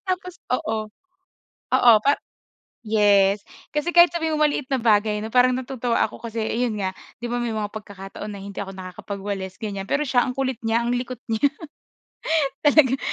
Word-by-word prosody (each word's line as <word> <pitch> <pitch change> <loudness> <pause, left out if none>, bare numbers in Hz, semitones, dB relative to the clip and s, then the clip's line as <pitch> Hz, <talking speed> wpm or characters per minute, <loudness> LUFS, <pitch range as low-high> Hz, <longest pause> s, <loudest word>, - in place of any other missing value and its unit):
Tapos 365 -1 -3 0.2
oo. 220 -3 -2 0.9
Oo 240 -2 +7
pa 285 +1 +4 0.7
yes. 205 -2 +4 0.3
Kasi 300 +4 -1
kahit 345 0 +7
sabihin 320 -2 0
mo 305 - +4
maliit 290 -2 -2
na - - +4
bagay 210 -2 +3
'no, 220 - -5
parang 250 0 +5
natutuwa 250 -2 -2
ako 215 - -12
kasi 230 -1 -4
ayun 230 0 -1
nga, 190 -1 -1 0.3
'di - - -2
ba 245 - 0
may 235 -1 -2
mga 210 -1 -2
pagkakataon 200 -1 -8
na 200 - -8
hindi 200 0 -9
ako 195 -1 -5
nakakapagwalis, 190 +1 -6
ganyan. 200 -2 -4
Pero 285 - +1
siya 245 -2 +3
ang 250 - -4
kulit 260 -3 -1
niya, 230 +1 +2
ang 240 - 0
likot 245 0 -4
niya 225 +6 +3 1.2
talagang, 280 -3 +5
230 Hz, 175 wpm, -23 LUFS, 205-260 Hz, 1.2 s, Oo